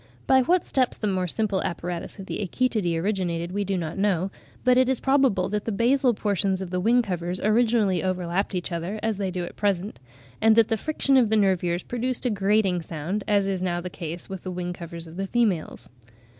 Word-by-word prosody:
By 265 0 +5
what 350 +7 +2
steps 255 -2 +1
the - - -3
more 185 -3 0
simple 200 +1 0
apparatus 175 +2 -4
in 195 - -8
the - - -4
Achetidae 205 -4 0
originated, 175 -3 -1
we 200 +2 -1
do 195 -1 -1
not 165 +1 -4
know, 195 -2 +1 0.3
but 250 0 +5
it 255 0 +4
is 265 - +1
probable 265 -9 +2
that 210 +1 -2
the 225 - -1
basal 245 +3 +2
portions 200 -2 0
of 190 -2 -6
the 180 - 0
wing 235 +6 +3
covers 180 -2 -3
originally 215 -4 +2
overlapped 185 +1 -1
each 180 0 -3
other 175 +5 -3
as 220 -3 -1
they 195 -2 -1
do 180 -1 -3
at - - -10
present; 200 0 -1 0.4
and 220 0 +5
that 230 0 +5
the 225 - +2
friction 275 +2 +1
of 240 -4 +4
the 220 - +3
nervures 180 -3 +1
produced 245 +1 -3
a 245 - +2
grating 195 -2 +2
sound, 165 +6 -4
as 205 -2 +3
is 195 -2 -2
now 175 -1 -1
the 180 +1 -6
case 170 -1 -6
with 190 -2 -6
the 185 - -6
wing 180 0 -3
covers 170 -1 -8
of 165 +1 -11
the 195 0 -2
females. 205 -8 0
195 Hz, 215 wpm, -25 LUFS, 180-225 Hz, 0.4 s, By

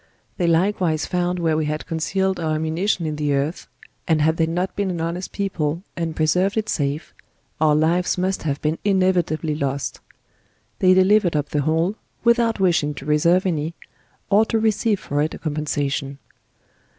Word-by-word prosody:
'1 175 - +1
hey - - +4
likewise 170 -2 +1
found 180 0 -1
where 165 -2 +1
we 155 0 0
had 150 +1 -3
concealed 190 +4 -1
our 160 -2 0
ammunition 165 +4 -1
in 155 -1 -3
the 145 -1 0
earth; 145 +5 -2 0.4
and 160 -3 +3
had 160 +2 +2
they 160 - +2
not 175 +3 -2
been 200 -1 -1
an 175 -2 -3
honest 170 +3 -3
people, 170 -4 -2
and 165 -2 -3
preserved 180 +6 +1
it 215 -1 0
safe, 145 +1 -2 0.5
our 155 -1 +4
lives 170 +5 +2
must 185 +1 -1
have 145 -3 -2
been 155 +2 0
inevitably 185 -5 +1
lost; 140 -2 -3 0.8
they 185 0 +5
delivered 190 -2 +4
up 145 -1 -1
the 150 - 0
whole, 165 +6 +1 0.3
without 235 -2 +3
wishing 165 -6 +2
to 135 - -9
reserve 170 +5 +3
any, 165 -2 -1 0.6
or 205 +2 +6
to 225 0 0
receive 220 -1 +1
for 145 +1 -2
it 155 - -1
a - - -8
compen 150 -1 -3
sation. 140 -1 -2
165 Hz, 175 wpm, -22 LUFS, 150-185 Hz, 0.8 s, or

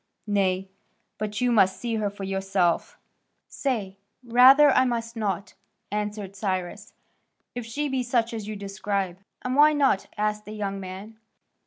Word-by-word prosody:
Nay, 195 -2 0 0.5
but 210 +1 -3
you 250 -1 +2
must 190 -4 +4
see 230 +1 -2
her 210 -1 0
for 200 0 -9
yourself." 195 -2 0 0.5
"Say, 210 -8 -3 0.2
rather, 260 +5 +7
I 255 - +4
must 235 -2 -2
not," 200 -3 -3 0.4
answered 210 -1 -4
Cyrus, 190 +1 -3 0.6
"if 245 -2 -6
she 290 +6 -2
be 265 -2 -1
such 235 -1 0
as 220 -2 -5
you 215 - -4
describe." 195 -2 -3 0.2
"And 255 +1 -1
why 300 +2 +6
not?" 275 -9 +2
asked 210 0 -1
the 210 - -8
young 200 -2 -3
man. 195 +4 -9
210 Hz, 150 wpm, -25 LUFS, 195-240 Hz, 0.6 s, rather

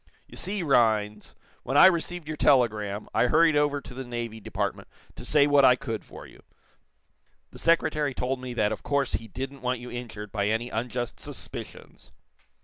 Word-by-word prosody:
You - - -14
see, 195 0 -2
Rhinds, 110 -7 +1 0.3
when 135 +3 -1
I - - +9
received 175 -2 +1
your 155 - -4
telegram, 110 -8 +2
I 125 - +3
hurried 160 +3 +4
over 145 -1 +2
to 125 - -11
the 130 +1 -6
Navy 120 -2 -5
Department 105 - -4 0.3
to - - -9
say 150 -2 +4
what 145 -1 +4
I 125 -1 +7
could 120 -5 -5
for - - -12
you. - - -16 1.1
The - - -12
Secretary 155 -4 +1
told 130 +1 -2
me 125 -1 -6
that 105 -2 +1
of 110 - -4
course 140 -2 -1
he 110 +3 -3
didn't 135 +5 -6
want 125 -1 -1
you 125 +1 -9
injured 110 -4 -7
by 100 -2 -1
any 115 +3 -1
unjust 120 +2 -3
suspicions." - - -7
125 Hz, 180 wpm, -26 LUFS, 110-145 Hz, 1.1 s, I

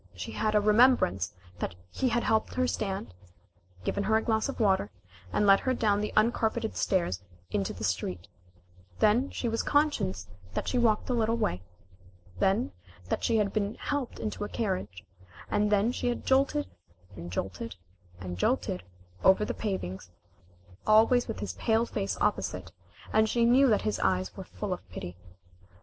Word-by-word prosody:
She - - -6
had 215 -1 0
a - - +6
remembrance 210 - +4 0.3
that 85 - -3 0.2
he 255 - 0
had 240 0 +1
helped 220 -1 +1
her 255 - +2
stand 195 - -3 0.7
given 200 - -1
her 220 +2 +4
a - - +1
glass 220 +2 +1
of 275 - -5
water 190 - +2 0.4
and 210 - +2
led 195 -1 +7
her 255 -1 0
down 205 -3 +2
the 210 - -2
uncarpeted 220 0 +1
stairs 170 - 0
out - - -26 0.3
into 100 -2 0
the - - -8
street. 90 -2 -2 0.7
Then 235 - +3
she 240 - -3
was 230 0 0
conscious 290 - +1 0.3
that - - -2
she 250 - +1
walked 220 -3 +2
a - - +2
little 230 -1 +1
way. 90 - -1 0.8
Then 190 - +2 0.4
that - - -1
she 230 - +2
had 205 -2 +1
been 210 0 -1
helped 285 -4 -3
into 215 -1 -4
a 205 - -4
carriage, 185 - -3 0.5
and 210 0 +2
then 210 +3 +3
she 250 - -2
had 240 - -2
jolted 265 - +2 0.5
and 85 +1 -8
jolted 95 +5 -4 0.4
and 90 -1 -6
jolted 90 - 0 0.4
over 190 +2 +5
the - - -2
pavings, 95 - -4 0.8
always 225 +3 +5
with 90 - -5
his 100 -3 -3
pale 225 - +1
face 200 -4 -3
opposite, - - -1 0.4
and 220 0 +4
she 235 +1 +2
knew 260 +4 +6
that 215 -4 +3
his 215 - -1
eyes 185 0 0
were 190 - -7
full 205 0 -4
of 175 - -9
pity. 90 -1 -7
210 Hz, 170 wpm, -29 LUFS, -, 0.8 s, led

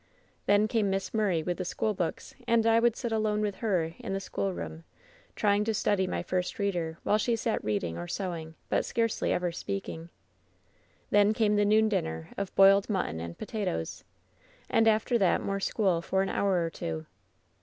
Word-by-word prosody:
Then 205 +1 +4
came 215 -3 +1
Miss 195 0 -2
Murray 195 -7 +1
with 175 +1 -2
the - - -1
school 215 +4 -1
books, 175 -4 -3
and 230 -1 +3
I 225 0 +5
would 235 -1 +3
sit 235 - -4
alone 215 -1 +1
with 205 -2 -2
her 180 -8 0
in - - -4
the 195 - -1
schoolroom, 185 -4 -4 0.5
trying 205 -1 +2
to 220 -1 0
study 190 -2 +1
my - - -2
first 180 -1 -2
reader, 175 -5 -1
while 210 - +2
she 235 +2 +1
sat 225 0 -1
reading 90 -6 -2
or 85 - -5
sewing, 165 - -4
but - - +1
scarcely 230 -1 0
ever 180 -1 0
speaking. 170 -2 -5 1.0
"Then 205 +1 +5
came 215 -1 +2
the 205 0 +3
noon 215 +1 +4
dinner 80 - -2
of 200 -1 -4
boiled 195 +1 +6
mutton 185 - -1
and 85 +1 -6
potatoes. 190 - -3 0.7
"And 225 - +4
after 220 +2 +3
that 190 -3 +3
more 195 0 -1
school 190 -4 +1
for 190 +3 0
an 195 - -2
hour 185 -4 +1
or 165 - -4
two. 80 - -5
195 Hz, 185 wpm, -29 LUFS, 170-215 Hz, 1.0 s, boiled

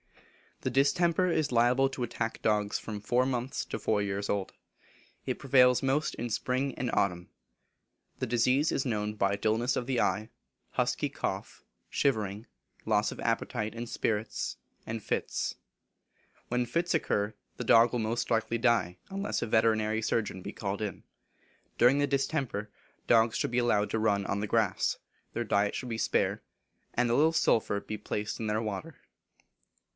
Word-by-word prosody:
The - - -1
distemper 170 +6 +3
is 155 -5 +1
liable 125 +3 +4
to 130 -2 -4
attack 115 -1 -3
dogs 105 -1 +1
from 105 -2 -6
four 120 +4 +2
months 130 0 -2
to - - -4
four 105 -2 +1
years 100 0 -2
old. 100 -2 -1 0.7
It - - -2
prevails 125 -2 +5
most 135 +3 +1
in 120 +1 -4
spring 130 +3 -1
and 125 - -2
autumn. 90 -4 0 0.9
The - - 0
disease 125 +6 +2
is 135 - 0
known 105 -3 -1
by 100 -1 +1
dulness 110 +4 +1
of 125 - -1
the 130 -3 +1
eye, 105 +4 0 0.4
husky - - 0
cough, - - -4 0.3
shivering, 110 -5 0 0.4
loss - - +2
of - - -9
appetite 105 +1 -1
and 120 +1 -5
spirits, 110 -2 -2 0.3
and 110 -1 -5
fits. - - -2 0.9
When 125 0 0
fits 170 +8 0
occur, 105 -9 0 0.2
the - - -3
dog 115 0 +6
will 125 - -1
most 115 +2 -1
likely 115 0 +1
die, 115 -7 +2
unless 195 +1 -2
a - - -2
veterinary 110 0 +2
surgeon 105 -4 -1
be 100 - -6
called 100 0 -3
in. 105 -2 -4 0.7
During 125 +4 +5
the 145 - +2
distemper, 135 -6 -1 0.4
dogs 115 -1 +4
should - - -1
be 125 - +2
allowed 105 -4 +2
to 110 - 0
run 100 -2 +1
on 100 +1 -1
the 105 - -2
grass; 105 -3 +1 0.4
their 120 - -1
diet 100 -2 +1
should 125 - -4
be 115 -1 -3
spare; - - +1 0.5
and 125 0 +2
a 120 - +3
little 155 +4 +4
sulphur 110 -9 +2
be 105 +1 -6
placed 105 0 -4
in 110 - -2
their 105 +1 0
water. 115 +9 -5
115 Hz, 165 wpm, -30 LUFS, 105-125 Hz, 0.9 s, dog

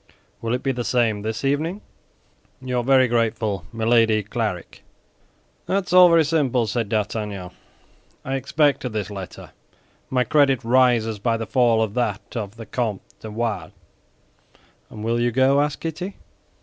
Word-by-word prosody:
Will 115 +1 -1
it 125 - -5
be 135 - +1
the 125 -2 -3
same 115 -4 +1
this 110 +5 -4
evening? 155 +8 0 0.8
Your 125 -1 -2
very 130 0 +4
grateful, 110 -6 -1
MILADY 115 -1 +2
CLARIK 105 -4 -4 0.9
"That's 190 -2 -1
all 180 -1 +8
very 165 -2 +5
simple," 140 -6 +1
said 110 0 -2
D'Artagnan; 105 -3 -3 0.7
"I 135 - -3
expected 135 -2 +1
this 105 -2 -3
letter. 95 -2 -8 0.6
My 125 -1 +2
credit 140 -3 +2
rises 115 -3 +3
by 115 +2 0
the 115 - -4
fall 115 -1 +3
of 105 -2 -4
that 110 -3 -3
of 105 -3 -4
the 115 -1 -9
Comte 110 -3 -3 0.2
de 110 - -8
Wardes." 105 -6 -3 1.2
"And 105 - -9
will 115 +1 0
you 120 0 +2
go?" 135 +3 +3
asked 145 -1 -2
Kitty. 175 +4 -5
120 Hz, 150 wpm, -22 LUFS, 110-135 Hz, 1.2 s, all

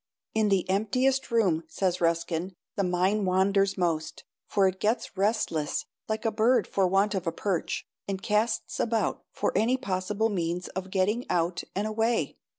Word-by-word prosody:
"In 220 -1 +2
the 195 -3 +2
emptiest 255 +8 +1
room," 195 -9 +2
says 180 +1 -1
Ruskin, 170 +2 0 0.2
"the 200 - +1
mind 185 +3 +1
wanders 195 +2 +2
most, 160 -3 -1 0.2
for 195 -2 +3
it 190 0 -2
gets 220 0 0
restless 195 -7 0 0.2
like 215 +1 -2
a 225 - +2
bird 235 +4 +3
for 195 -2 +1
want 195 +3 +2
of 190 -3 -2
a - - +2
perch, 180 0 -2 0.2
and 195 -1 -2
casts 215 +3 0
about 225 -1 0
for - - -1
any 245 +4 +3
possible 205 -1 -1
means 175 -2 -2
of 190 +1 -5
getting 205 +6 0
out 170 0 0
and 200 +2 0
away. 225 +2 0
195 Hz, 160 wpm, -28 LUFS, 180-215 Hz, 0.2 s, for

